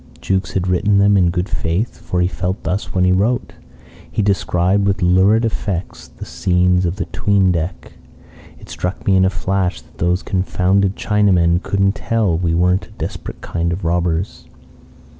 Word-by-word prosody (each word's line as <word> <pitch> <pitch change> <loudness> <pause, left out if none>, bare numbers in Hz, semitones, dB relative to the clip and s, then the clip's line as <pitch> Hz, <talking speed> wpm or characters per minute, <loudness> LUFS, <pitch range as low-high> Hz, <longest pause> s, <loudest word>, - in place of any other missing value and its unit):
Jukes 95 -5 -2
had 95 -1 -1
written 100 +3 +2
them 100 +1 +4
in 90 -3 +4
good 90 +2 -2
faith, 85 +2 -2
for 90 +1 -2
he 90 - +2
felt 90 +2 -3
thus 90 +5 -2
when 90 - +1
he 90 - +3
wrote. 105 +7 0 0.6
He 105 - -1
described 100 0 +1
with 100 -1 0
lurid 95 +6 +4
effect 100 -5 -4
the - - -7
scenes 90 +7 +1
in 85 - -1
the 95 - -3
'tween 100 -2 +1
deck. 85 0 -4 0.3
"... - - -21
It - - -14
struck 90 +1 -5
me 95 - +3
in 95 0 +4
a - - +3
flash 90 +1 -1
that - - -23
those 90 +2 0
confounded 95 +1 0
Chinamen 90 -5 +2
couldn't 100 0 +1
tell 110 -6 0
we 85 -1 0
weren't 90 +2 +1
a - - -20
desperate - - -6
kind 85 0 -2
of 85 +1 -4
robbers. 85 +1 -1
90 Hz, 180 wpm, -18 LUFS, 90-100 Hz, 0.6 s, them